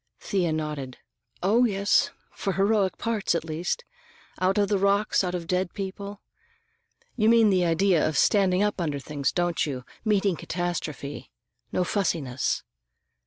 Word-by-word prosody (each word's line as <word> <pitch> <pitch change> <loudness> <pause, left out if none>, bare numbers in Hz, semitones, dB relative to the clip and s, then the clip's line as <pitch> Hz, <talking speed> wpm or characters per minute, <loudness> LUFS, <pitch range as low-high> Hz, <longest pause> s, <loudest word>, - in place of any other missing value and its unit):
Thea 180 -5 0
nodded. 150 -5 -4 0.5
"Oh, 220 +6 +4
yes! 200 -2 +2 0.2
For 195 - -3
heroic 200 0 +2
parts, 220 -6 0
at 170 - -2
least. 170 - -3 0.5
Out 185 +2 +2
of 205 -1 +3
the 200 -1 +1
rocks, 200 +1 +2
out 180 -1 -2
of 180 - -2
the 165 - -13
dead 180 0 -1
people. 200 +1 -6 0.9
You 220 -1 +3
mean 230 -2 +6
the 180 -2 +3
idea 170 -1 +3
of 155 - -3
standing 195 -2 +3
up 210 -3 0
under 150 -4 -1
things, 140 -1 -2
don't 175 -1 0
you, 130 -4 -4 0.2
meeting 205 -4 +2
catastrophe? 165 -5 -4 0.4
No 180 - +1
fussiness. 160 - -1
185 Hz, 150 wpm, -26 LUFS, 160-200 Hz, 0.9 s, mean